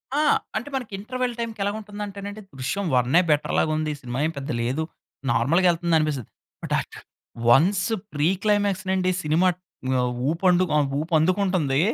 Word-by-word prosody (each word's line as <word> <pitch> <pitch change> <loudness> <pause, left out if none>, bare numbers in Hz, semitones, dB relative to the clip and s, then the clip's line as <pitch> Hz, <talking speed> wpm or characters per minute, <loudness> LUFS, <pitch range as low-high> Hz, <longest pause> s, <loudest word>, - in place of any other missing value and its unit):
ఆ! - - +2 0.4
అంటే 240 +6 -4
మనకి 250 -5 -4
ఇంటర్వల్ 250 +3 -2
టైమ్‌కెలా 220 -4 -2
ఉంటుందంటే 205 -1 -7
నండి. 205 +1 -6 0.2
'దృశ్యం' 195 +10 -2
వన్నె, 125 +8 +4
బెటర్ 150 0 +1
లాగా 155 - +2
ఉంది. 155 -1 -1
సినిమా 125 0 -4
ఏం 160 - 0
పెద్ద 140 0 -5
లేదు, 130 +7 -1 0.5
నార్మల్‌గెళ్తుంది 170 +7 +3
అనిపిస్తది. 150 -7 -2 0.3
But - - -3
a - - 0 0.7
once 185 +10 +4 0.3
pre 150 +1 +2 0.2
climax 205 -2 +1
నుండి 185 -1 +2
సినిమా 160 +4 +3 0.5
ఆహ్, 125 0 0 0.2
ఊప్ 165 +4 -3
ఆహ్, 175 -5 +3
ఊపందుకుంటుంది. 165 -2 +1
175 Hz, 145 wpm, -24 LUFS, 150-205 Hz, 0.7 s, వన్నె